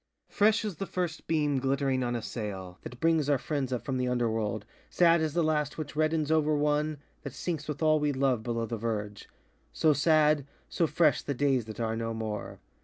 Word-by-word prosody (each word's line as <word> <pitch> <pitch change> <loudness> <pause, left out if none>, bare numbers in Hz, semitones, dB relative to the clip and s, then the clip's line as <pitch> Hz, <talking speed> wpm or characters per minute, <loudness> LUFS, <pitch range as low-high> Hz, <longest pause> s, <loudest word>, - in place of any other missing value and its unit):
Fresh 215 +2 +3
as 205 -6 -4
the 195 - -4
first 175 -3 -3
beam 150 -4 +1
glittering 135 -1 0
on 120 0 -1
a 115 - -3
sail, 100 -4 -6
That 125 - -9
brings 160 -2 +2
our 145 - +4
friends 135 -1 -3
up 125 - -3
from 135 -2 -1
the 125 - 0
underworld, 110 -4 -1 0.2
Sad 170 -1 +4
as 155 -1 -1
the 170 - +3
last 150 -2 0
which 155 -1 -6
reddens 155 0 +1
over 155 -1 +3
one 150 +1 +1 0.2
That - - -7
sinks 160 -4 -4
with 150 +1 -3
all 155 0 +4
we 150 -1 +1
love 130 -4 +1
below 115 0 -2
the 115 +1 -4
verge; 105 -2 -4 0.4
So 155 -1 +3
sad, 150 -1 +3 0.2
so 165 - 0
fresh, 155 0 +3
the 140 - -3
days 135 -3 +1
that 110 0 -9
are 110 -1 -1
no 115 0 -3
more. 110 -2 -5
140 Hz, 205 wpm, -29 LUFS, 115-155 Hz, 0.4 s, our